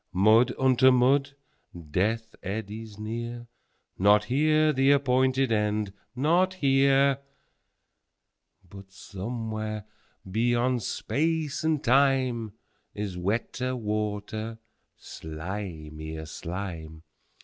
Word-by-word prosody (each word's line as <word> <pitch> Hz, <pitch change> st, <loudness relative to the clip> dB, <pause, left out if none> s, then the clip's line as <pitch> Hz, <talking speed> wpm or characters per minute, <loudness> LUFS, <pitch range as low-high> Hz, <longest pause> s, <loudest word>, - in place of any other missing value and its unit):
15Mud 110 Hz, +6 st, +5 dB
unto 130 Hz, 0 st, +5 dB
mud! 135 Hz, +3 st, +3 dB, 0.6 s
Death 110 Hz, +6 st, 0 dB
eddies 105 Hz, +2 st, -6 dB
near 115 Hz, +2 st, -5 dB, 0.5 s
16Not 105 Hz, +2 st, +5 dB
here 155 Hz, +5 st, +2 dB
the 135 Hz, 0 st, +3 dB
appointed 130 Hz, -2 st, +3 dB
End, 105 Hz, -2 st, 0 dB, 0.2 s
not 175 Hz, +8 st, +2 dB
here!17But 135 Hz, -, -2 dB
somewhere, 110 Hz, +2 st, -5 dB, 0.4 s
beyond 120 Hz, +4 st, +1 dB
Space 155 Hz, +8 st, -1 dB
and 160 Hz, -2 st, +1 dB
Time.18Is 120 Hz, -7 st, 0 dB
wetter 120 Hz, +7 st, -2 dB
water, 110 Hz, 0 st, -3 dB, 0.4 s
slimier 80 Hz, -2 st, -7 dB
slime! 80 Hz, -2 st, -6 dB
115 Hz, 75 wpm, -27 LUFS, 100-135 Hz, 0.6 s, 15Mud